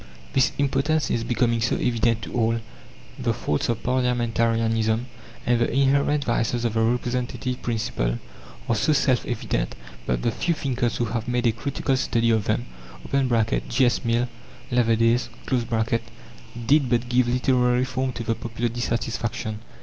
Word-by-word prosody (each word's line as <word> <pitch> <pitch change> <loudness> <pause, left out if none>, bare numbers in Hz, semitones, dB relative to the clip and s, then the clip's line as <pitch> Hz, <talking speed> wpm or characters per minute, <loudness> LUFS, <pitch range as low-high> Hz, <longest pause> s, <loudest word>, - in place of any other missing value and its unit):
This 130 - +3
impotence 145 +2 +1
is 115 - 0
becoming 115 -1 +1
so 115 - +1
evident 115 -1 +1
to - - -7
all; 115 -1 +1 0.6
the - - 0
faults 75 +8 -1
of 115 - -1
parliamentarianism, 115 -2 +1 0.4
and 120 -1 +3
the 120 - +1
inherent 140 +2 +2
vices 120 0 0
of 115 - 0
the 115 - +1
representative 125 +2 -1
principle, 110 - -1 0.5
are 115 - +2
so 155 +8 +2
self 130 -4 +2
evident, - - -2 0.3
that - - 0
the - - +2
few 170 +9 0
thinkers 125 -5 -1
who 120 - +1
have 115 0 -3
made 125 0 0
a 115 - +5
critical 135 +3 -1
study 115 -3 +1
of 110 -2 +1
them - - 0 0.5
(J. 125 -1 +2
S. 120 - +1
Mill, 120 +1 +1 0.4
Leverdays), 115 0 +3 1.4
did 140 +1 +4
but 120 0 +1
give 125 0 +2
literary 125 0 +2
form 130 0 -2
to 115 - -5
the 115 - 0
popular 115 +1 -3
dissatisfaction. 115 -2 -2
120 Hz, 150 wpm, -24 LUFS, 115-125 Hz, 1.4 s, a